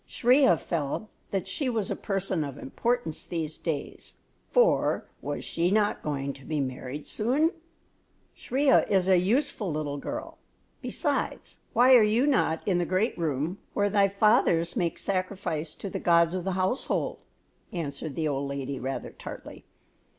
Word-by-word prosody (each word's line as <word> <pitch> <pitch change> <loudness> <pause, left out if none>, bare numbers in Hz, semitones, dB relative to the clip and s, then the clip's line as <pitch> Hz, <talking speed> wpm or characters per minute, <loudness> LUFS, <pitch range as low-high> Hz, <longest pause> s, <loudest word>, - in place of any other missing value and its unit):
Shriya 260 +3 +4
felt 165 +6 -3 0.2
that 195 -1 -2
she 260 +8 -1
was 220 -5 -1
a - - 0
person 195 -4 -1
of 140 -2 -6
importance 235 - -2
these 160 -2 -4
days, 155 -4 -4 0.3
for - - +3 0.2
was - - -4
she 170 +1 0
not 210 +1 +2
going 140 -2 -2
to 135 - -14
be 155 +2 -2
married 130 +2 -4
soon! 275 +9 +1 0.8
"Shriya 270 +2 +2
is 190 -2 +3
a 185 -2 +5
useful 210 - 0
little 150 -2 -3
girl; - - -6 0.4
besides, - - -2 0.2
why 250 +2 +6
are 245 - +9
you 220 +5 +3
not 225 - +1
in 180 -3 +2
the - - +2
great 185 +7 +1
room 160 +2 -2 0.2
where 205 -1 +2
thy 200 -1 +4
fathers 200 -4 +3
make 175 -7 0
sacrifice 185 -5 -2
to - - -7
the - - -4
Gods 170 -1 +4
of 185 -1 -3
the 190 - 0
Household?" 190 +7 -1 0.5
answered 150 -3 -4
the 160 -1 0
old 140 -1 -2
lady, 140 -1 -4
rather 135 +1 -4
tartly. - - -10
185 Hz, 155 wpm, -27 LUFS, 155-215 Hz, 0.8 s, are